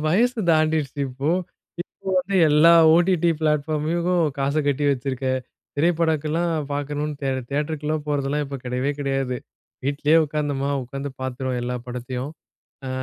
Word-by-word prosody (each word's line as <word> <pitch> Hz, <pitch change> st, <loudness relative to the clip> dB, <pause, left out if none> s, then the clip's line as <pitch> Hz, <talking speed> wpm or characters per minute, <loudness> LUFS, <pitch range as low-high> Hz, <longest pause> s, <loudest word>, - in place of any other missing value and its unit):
வயசு 235 Hz, +7 st, +2 dB
தாண்டிருச்சு 155 Hz, -3 st, +1 dB
இப்போ. 135 Hz, +5 st, -2 dB, 0.5 s
இப்போ 190 Hz, -, -12 dB
வந்து, 190 Hz, +2 st, -1 dB
எல்லா 155 Hz, +3 st, +6 dB, 0.2 s
OTT 175 Hz, 0 st, +3 dB, 0.2 s
பிளாட்ஃபார்மக்கும் 155 Hz, +3 st, +1 dB, 0.2 s
காச 140 Hz, +2 st, 0 dB
கட்டி 145 Hz, 0 st, +1 dB
வச்சிருக்கேன், 130 Hz, -1 st, -1 dB, 0.4 s
திரைப்படக்கலாம் 160 Hz, +1 st, +1 dB, 0.2 s
பார்க்கணும்னு 145 Hz, +1 st, -2 dB
தே 135 Hz, -, 0 dB, 0.2 s
தியேட்டருக்குலாம் 150 Hz, +1 st, -2 dB
போறதெல்லாம் 145 Hz, 0 st, 0 dB
இப்ப 140 Hz, 0 st, -5 dB
கடையவே 125 Hz, +3 st, -1 dB
கடையாது. 135 Hz, -3 st, -1 dB, 0.5 s
வீட்லயே 145 Hz, +3 st, +2 dB
உட்கார்ந்தோமா 145 Hz, -2 st, -2 dB
உட்காந்து 135 Hz, +3 st, -5 dB
பார்த்துருவோம் 130 Hz, -1 st, -2 dB
எல்லா 125 Hz, +1 st, -2 dB
படத்தையும். 125 Hz, +2 st, -5 dB, 0.6 s
ஆ -, -, -3 dB
145 Hz, 120 wpm, -23 LUFS, 135-155 Hz, 0.6 s, எல்லா